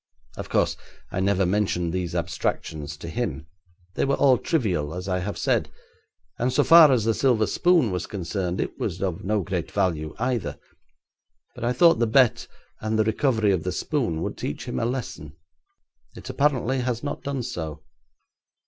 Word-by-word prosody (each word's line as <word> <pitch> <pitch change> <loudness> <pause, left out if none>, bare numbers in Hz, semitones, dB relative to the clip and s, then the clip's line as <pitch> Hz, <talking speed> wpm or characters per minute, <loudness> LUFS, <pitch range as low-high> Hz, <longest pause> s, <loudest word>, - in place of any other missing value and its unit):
Of - - -7
course, - - +1 0.3
I - - -2
never 95 0 +2
mentioned 90 -3 0
these 90 -2 -3
abstractions 75 -3 -3
to 85 - -8
him. 115 -4 -3 0.5
They - - -1
were 140 0 +2
all 130 -4 +4
trivial, 90 - -1
as 90 +1 -5
I 90 -1 0
have 100 +3 -4
said, - - +1 0.7
and 125 +2 +1
so - - +3
far 165 -3 +8
as 120 -5 +2
the 115 - +3
silver 120 -3 +2
spoon 170 - +3
was 90 -1 -3
concerned, 90 -1 -3
it - - -3
was 85 - -3
of 90 -4 -2
no 105 0 0
great 90 -2 -3
value 80 -6 -1
either. 120 -5 -2 1.0
But - - -5
I 120 - +1
thought 165 +6 +5
the 115 - +2
bet 125 +1 +3 0.3
and 110 0 -1
the 110 - +4
recovery 110 -1 +1
of 95 -4 +1
the 90 - -2
spoon 110 - -1
would - - -5
teach 75 - -4
him 120 - -3
a 115 - 0
lesson; 90 - -5 0.8
it - - -10
apparently 135 -2 +1
has 125 -1 -2
not 145 - -4
done 135 -2 -3
so. 80 - -5
105 Hz, 175 wpm, -25 LUFS, 90-125 Hz, 1.0 s, far